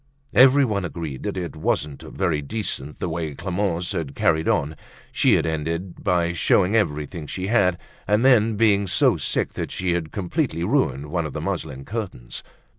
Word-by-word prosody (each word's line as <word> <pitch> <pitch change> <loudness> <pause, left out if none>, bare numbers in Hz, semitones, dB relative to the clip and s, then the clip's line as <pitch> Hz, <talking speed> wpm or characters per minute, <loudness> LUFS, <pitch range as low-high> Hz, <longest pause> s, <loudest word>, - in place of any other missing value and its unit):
Everyone 130 -4 +5
agreed 80 -6 -5
that 100 -2 -3
it 85 -4 -4
wasn't 75 -2 -1
very 85 -6 -1
decent 75 -4 -3
the - - -3
way 80 -3 -3
Clemence 90 0 -1
had 80 -8 -3
carried 80 0 +2
on. 75 +3 +1 0.4
She - - +4
had - - +1
ended 80 +3 -3
by 85 -1 +1
showing 90 +4 +3
everything 75 -5 -1
she 95 +4 -4
had 95 -6 +3 0.3
and 105 +4 +3
then 115 -4 +5
been 100 -2 +3
so - - +3
sick - - -1
that - - -4
she 90 -1 -1
had 85 -2 -2
completely 95 - -2
ruined 75 - 0
one 85 -2 0
of 70 - -9
the - - -3
muslin 70 -3 -4
curtains. 95 - -5
85 Hz, 170 wpm, -23 LUFS, 80-105 Hz, 0.4 s, Everyone